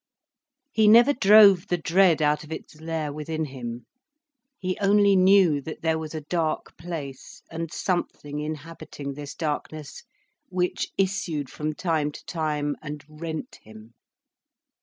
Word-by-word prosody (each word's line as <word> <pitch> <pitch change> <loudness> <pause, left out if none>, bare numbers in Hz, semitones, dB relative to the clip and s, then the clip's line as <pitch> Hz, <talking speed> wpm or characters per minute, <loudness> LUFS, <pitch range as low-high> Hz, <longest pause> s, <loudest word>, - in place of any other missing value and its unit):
He 220 -4 +3
never 235 +6 +7
drove 200 -6 +7
the 175 - 0
dread 170 -1 +3
out 150 +1 +2
of 155 - -13
its 155 -1 -8
lair 160 -2 -3
within 155 +1 -3
him. 120 -4 -7 0.7
He 185 -1 -2
only 200 0 +4
knew 185 -5 +5
that 155 +3 -8
there 160 -1 +1
was 160 0 -6
a 155 - -4
dark 160 -1 -2
place, 155 -6 -8
and 165 -1 -5
something 150 -6 -3
inhabiting 150 -2 -6
this 145 0 -8
darkness 155 -1 -4 0.5
which 180 -1 -1
issued 185 -8 -1
from 155 0 -3
time 155 -3 -1
to - - -12
time 150 -3 -2
and 150 -2 -7
rent 160 +1 -7
him. 110 +1 -15
160 Hz, 140 wpm, -25 LUFS, 150-180 Hz, 0.7 s, never